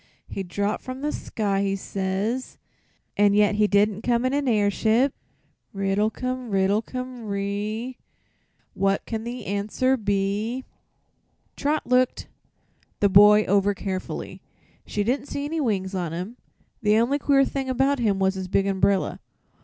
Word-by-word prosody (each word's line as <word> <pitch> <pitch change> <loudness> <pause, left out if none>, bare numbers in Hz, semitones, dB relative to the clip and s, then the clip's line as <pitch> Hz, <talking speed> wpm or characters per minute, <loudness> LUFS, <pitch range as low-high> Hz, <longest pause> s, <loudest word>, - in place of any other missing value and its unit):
He - - -5
dropped 200 +3 -2
from 255 +1 -6
the 300 +1 -1
sky, 200 -7 -2
he 195 0 0
says, 195 +6 -3 0.6
an' 205 0 +4
yet 210 0 +4
he 210 0 +3
did'nt 205 0 +2
come 240 +1 +1
in 255 - +1
a 285 -2 +1
airship! 220 +5 +2 0.6
"'Riddlecum, 220 +6 -1
riddlecum 220 +5 -1
ree; 205 +5 -3 0.7
What 195 +1 0
can 225 -1 -4
the 245 +1 -6
answer 215 +6 0
be?'" 205 +4 -1 0.9
Trot 295 +2 -1
looked 250 0 +1 0.7
the 200 - +4
boy 210 +2 +7
over 200 0 +2
carefully. 190 -1 -5 0.5
She 205 - -1
didn't 260 +6 -1
see 285 - -4
any 315 +2 -2
wings 195 -7 -1
on 175 -4 -2
him. 185 +8 -5 0.4
The 210 -1 +3
only 250 +6 +2
queer 275 -1 +4
thing 270 -1 -3
about 270 +2 +2
him 210 -5 +1
was 190 0 +2
his 190 -1 -5
big 195 +1 +1
umbrella. 195 0 +1
210 Hz, 140 wpm, -24 LUFS, 195-255 Hz, 0.9 s, boy